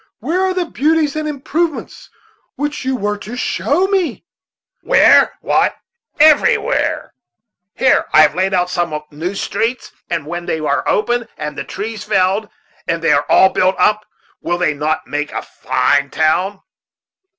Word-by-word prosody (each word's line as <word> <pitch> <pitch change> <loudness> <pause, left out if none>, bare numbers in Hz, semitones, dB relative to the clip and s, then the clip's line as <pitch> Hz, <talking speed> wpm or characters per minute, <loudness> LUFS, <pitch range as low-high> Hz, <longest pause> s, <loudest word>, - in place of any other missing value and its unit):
Where 350 +3 -2
are 380 0 +1
the 365 -1 0
beauties 310 -1 0
and 310 0 -2
improvements 305 +2 -3 0.5
which 295 0 -3
you 260 0 -1
were 210 -3 -2
to 220 +4 -8
show 295 +7 0
me?" 375 - -1 0.6
"Where? - - +4
why, - - +1 0.4
everywhere! 310 +10 +3 0.6
Here 260 - +3
I 155 - +7
have 150 - +3
laid 190 +1 0
out 180 -1 0
some 170 -4 -1
new 170 +6 -4
streets; 230 +5 -2 0.2
and 160 - -2
when 175 +2 -6
they - - -1
are 145 -2 0
opened, 240 +2 0
and 150 -1 -5
the 140 - -4
trees 210 +6 -6
felled, 195 +3 0 0.4
and 165 0 -2
they 165 - +3
are 145 - +1
all 190 - +6
built 185 0 +1
up, 210 +3 +1 0.3
will 175 - -1
they 170 -4 +1
not 150 +2 -2
make 145 +1 -3
a - - -4
fine 140 -1 0
town? 180 +7 0
200 Hz, 155 wpm, -17 LUFS, -, 0.6 s, I